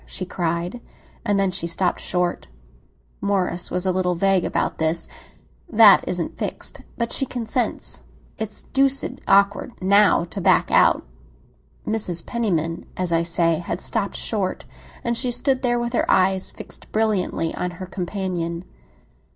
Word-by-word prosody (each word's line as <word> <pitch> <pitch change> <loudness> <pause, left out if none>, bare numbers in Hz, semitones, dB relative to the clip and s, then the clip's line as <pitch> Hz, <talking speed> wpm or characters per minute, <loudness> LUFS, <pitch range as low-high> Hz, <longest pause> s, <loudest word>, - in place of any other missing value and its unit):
she 185 - -4
cried. 175 +5 -2 0.4
And 205 -1 +1
then 195 -1 +2
she 180 -2 -2
stopped 175 +2 0
short. 180 -1 -1 0.7
Morris 185 -3 0
was 180 +1 -2
a 185 - +3
little 180 -1 0
vague 195 0 +2
about - - -1
this. 160 +1 0 0.6
"That 215 -4 +8
isn't 175 -2 -3
fixed; - - -4 0.2
but 235 0 -2
she - - +1
consents. 240 0 -3 0.4
It's 215 -1 -4
deuced 275 0 +1
awkward, 200 +4 +3
now, 200 -1 +4
to 200 - -4
back - - +3
out." - - +4 0.8
Mrs. 195 -6 0
Penniman, 170 -8 -1
as 180 -2 -1
I 165 - +3
say, 170 -1 +1
had 175 0 -4
stopped 205 -2 -1
short; 200 -4 -2 0.4
and 235 0 0
she 250 +2 +2
stood 255 +2 +1
there 240 -2 +1
with 240 0 -3
her - - 0
eyes 190 0 +3
fixed - - -10
brilliantly 210 -6 0
on 180 - -2
her 185 - -6
companion. 180 -2 -3
190 Hz, 145 wpm, -22 LUFS, 175-220 Hz, 0.8 s, That